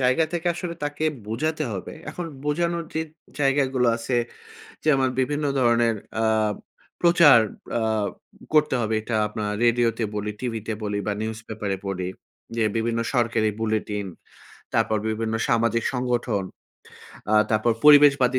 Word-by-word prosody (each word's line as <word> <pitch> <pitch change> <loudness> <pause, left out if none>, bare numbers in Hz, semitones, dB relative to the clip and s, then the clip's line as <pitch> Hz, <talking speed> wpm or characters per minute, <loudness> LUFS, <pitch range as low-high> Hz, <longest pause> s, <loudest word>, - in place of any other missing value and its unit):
জায়গা 130 +5 +3
থেকে 175 0 -3
আসলে 175 -1 -5
তাকে 145 +2 -3 0.2
বোঝাতে 155 +7 -1
হবে। 95 - -6 0.2
এখন 175 +3 -5 0.2
বোঝানোর 170 +3 0
যে 160 - 0 0.4
জায়গাগুলো 135 -2 +2
আছে 120 +2 -2 0.7
যেমন 135 -4 +3
বিভিন্ন 145 +3 -1
ধরনের 120 -2 +3 0.3
আ - - +2 0.8
প্রচার 170 -7 +7 0.4
আ - - -1 0.7
করতে 150 -3 +3
হবে 110 0 -1
এটা 110 0 -2
আপনার 105 -1 -3
রেডিওতে 120 -1 +2
বলি, 105 0 -2
টিভিতে 115 -3 -3
বলি 105 -1 -2
বা 105 - +1
নিউজ 110 0 -3
পেপারে 105 -3 -3
পড়ি 90 -2 -3 0.5
যে, 115 - +1
বিভিন্ন 115 +1 0
সরকারি 115 -3 +2
বুলেটিন, 105 -2 -1 0.7
তারপর 110 - +2
বিভিন্ন 110 0 -2
সামাজিক 115 0 +2
সংগঠন, 120 -5 -1 0.9
আ - - +5 0.2
তারপর 110 +2 +2
পরিবেশবাদী 140 -3 +7
120 Hz, 130 wpm, -24 LUFS, 110-145 Hz, 0.9 s, প্রচার